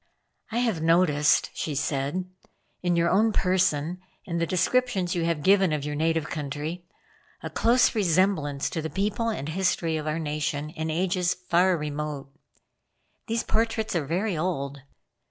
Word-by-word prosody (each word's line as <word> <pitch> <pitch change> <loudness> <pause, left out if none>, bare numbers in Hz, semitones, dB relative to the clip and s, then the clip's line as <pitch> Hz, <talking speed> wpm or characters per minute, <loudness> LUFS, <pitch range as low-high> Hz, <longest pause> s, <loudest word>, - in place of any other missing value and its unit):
"I 225 - -2
have 230 -9 0
noticed," 160 -3 +3
she 150 - -3
said, 140 +6 -1 0.6
"in 175 -1 +1
your 170 0 +2
own 220 +4 +4
person 180 -4 +1 0.3
and 170 -2 -2
the 170 - +1
descriptions 190 0 +1
you 170 -2 0
have 165 -3 -1
given 190 -2 +4
of 150 -2 -2
your 150 - -3
native 160 +1 0
country, 150 +4 -5 0.6
a - - -5
close 240 +2 +3
resemblance 175 - +1
to 160 - -2
the 160 - -4
people 205 +5 -1
and 150 -9 -3
history 165 -2 0
of 155 0 -5
our 155 +1 -1
nation 150 -1 -2
in 160 0 -4
ages 180 +2 0
far 180 0 +2
remote. 150 -2 -5 0.9
These 230 0 -1
portraits 220 -2 0
are 155 -5 -1
very 185 +5 0
old. 145 -5 -2
170 Hz, 155 wpm, -26 LUFS, 150-190 Hz, 0.9 s, own